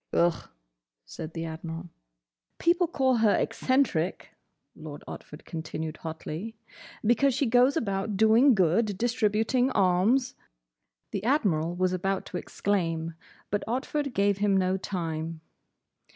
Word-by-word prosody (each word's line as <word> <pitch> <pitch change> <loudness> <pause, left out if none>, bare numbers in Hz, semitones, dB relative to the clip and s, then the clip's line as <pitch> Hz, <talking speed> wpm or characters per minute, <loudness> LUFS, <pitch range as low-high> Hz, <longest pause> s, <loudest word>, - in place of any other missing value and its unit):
"Ugh," 170 -1 +1 0.6
said 155 - -8
the 165 0 -3
Admiral. 165 +1 -6 0.7
"People 345 +1 +3
call 265 -6 +2
her 220 -2 +4
eccentric," 245 - 0 0.4
Lord 155 -2 -9
Otford 150 - -10
continued, 160 -1 -5
hotly, 165 +6 -6 0.5
"because 245 +4 +3
she 275 - +1
goes 250 +5 +4
about 200 -4 -1
doing 225 +5 +6
good—distributing 220 +5 +2
alms—" 210 +5 +2 0.8
The 200 - -3
Admiral 175 - +1
was 185 0 +1
about 190 +1 -1
to - - -5
exclaim, 165 -5 -1 0.4
but 205 - 0
Otford 270 +3 -2
gave 200 0 +2
him 200 -1 +3
no 185 0 +2
time. 165 -4 -4
195 Hz, 115 wpm, -27 LUFS, 165-240 Hz, 0.8 s, doing